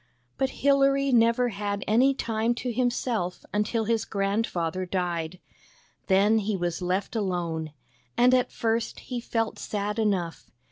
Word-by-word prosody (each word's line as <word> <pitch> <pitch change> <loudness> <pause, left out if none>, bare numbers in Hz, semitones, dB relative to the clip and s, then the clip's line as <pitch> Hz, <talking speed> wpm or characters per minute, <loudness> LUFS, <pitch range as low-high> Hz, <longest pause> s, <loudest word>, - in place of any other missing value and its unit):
But 265 - +2 0.2
Hilary 275 0 +4
never 235 +1 +4
had 200 -1 -3
any 255 +6 +4
time 230 -1 0
to 245 0 -3
himself 240 -6 -1
until 210 +2 0
his 225 0 +1
grandfather 195 -4 -1
died. 175 -2 -2 0.7
Then 205 +3 +4
he 210 -1 -1
was 175 0 -2
left 185 +5 -1
alone, 170 -6 -2 0.5
and 250 +1 +5
at 255 -1 +2
first 225 0 -1
he 245 -2 -5
felt 225 -1 -2
sad 210 +1 -3
enough. 190 -6 -1
215 Hz, 135 wpm, -26 LUFS, 185-240 Hz, 0.7 s, and